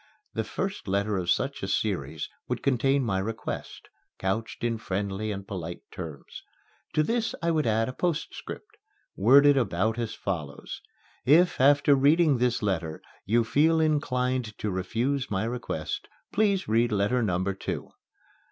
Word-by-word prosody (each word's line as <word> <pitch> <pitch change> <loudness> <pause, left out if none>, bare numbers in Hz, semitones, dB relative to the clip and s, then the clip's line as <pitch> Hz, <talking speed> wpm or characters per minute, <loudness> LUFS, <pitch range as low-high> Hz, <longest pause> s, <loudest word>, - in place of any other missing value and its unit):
The - - -1
first 195 - -4
letter 100 +2 0
of 90 -2 -2
such - - 0
a - - -3
series - - -1 0.2
would - - -3
contain 135 +1 +2
my 95 -4 0
request, 110 +3 -5 0.3
couched 110 +5 -2
in 115 -1 0
friendly 100 +1 -2
and 100 -1 -6
polite 85 -3 -5
terms. 80 -5 -8 0.5
To 155 - +3
this 225 +5 0
I 170 - +2
would 155 -6 +1
add 110 +1 +2
a 130 - -4
postscript, 180 - -4 0.4
worded 140 +7 +6
about 110 -1 +1
as 115 -2 -3
follows: 75 -7 -5 0.4
"If, 160 +4 +4
after 140 +1 +6
reading 145 0 +4
this 125 -2 +1
letter, 85 -6 -1 0.3
you 115 +3 +3
feel 160 +7 +3
inclined 130 -7 0
to 105 - -2
refuse 115 +9 -1
my 95 0 0
request, 115 -9 -4 0.3
please 200 -2 +2
read 115 +2 +2
letter 105 +5 +2
number 95 -2 0
two." 95 - -5
115 Hz, 145 wpm, -27 LUFS, 100-140 Hz, 0.5 s, worded